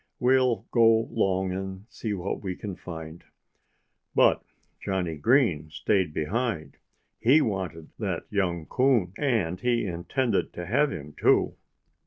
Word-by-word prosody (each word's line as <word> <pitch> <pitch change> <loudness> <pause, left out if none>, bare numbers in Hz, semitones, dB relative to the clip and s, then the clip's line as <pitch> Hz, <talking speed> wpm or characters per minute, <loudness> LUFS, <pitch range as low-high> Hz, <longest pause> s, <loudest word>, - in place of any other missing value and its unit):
We'll 125 -4 +3
go 115 -2 +5
'long 95 -4 +1
and 95 +1 -5
see 110 -3 -5
what 95 +1 -4
we 95 -3 -4
can 100 -1 -6
find." 80 -2 -9 0.9
But - - +4 0.4
Johnnie 90 -5 -2
Green 90 - +3
stayed 85 +3 0
behind. 80 - -2 0.4
He 130 +7 +5
wanted 95 - -3
that - - -2
young 90 -5 0
coon. 125 -8 +2
And 110 - 0
he 120 +1 +1
intended 95 +6 -1
to 90 - -6
have 140 - +2
him, 75 -1 -7
too. - - +3
95 Hz, 130 wpm, -27 LUFS, 85-115 Hz, 0.9 s, go